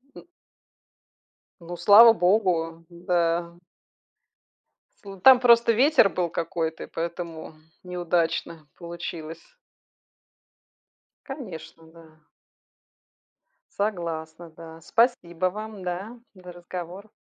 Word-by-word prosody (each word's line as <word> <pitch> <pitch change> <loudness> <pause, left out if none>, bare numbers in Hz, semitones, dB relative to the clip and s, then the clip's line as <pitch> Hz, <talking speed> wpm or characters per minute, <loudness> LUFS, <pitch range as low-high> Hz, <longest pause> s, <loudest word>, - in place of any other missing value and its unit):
М. - - -12 1.4
Ну, 170 +1 -8
слава 225 +5 +8
богу, 175 -5 0
да. 170 -1 -2 1.4
Слу 195 -1 -10
там 255 +6 +7
просто 235 -1 +5
ветер 255 -1 +4
был 180 -2 -2
какой-то, 165 0 -4
и - - -10
поэтому 165 -1 -6 0.3
неудачно 170 -3 -2
получилось. 170 -2 -8 1.9
Конечно, 185 - -9
да. 160 -1 -19 1.6
Согласна, 170 -5 -4
да. 160 0 -13
Спасибо 185 -5 0
вам, 210 0 -9
да, 190 +7 -6
за 180 -2 -13
разговор. 180 +3 -9
175 Hz, 85 wpm, -24 LUFS, 165-200 Hz, 1.9 s, слава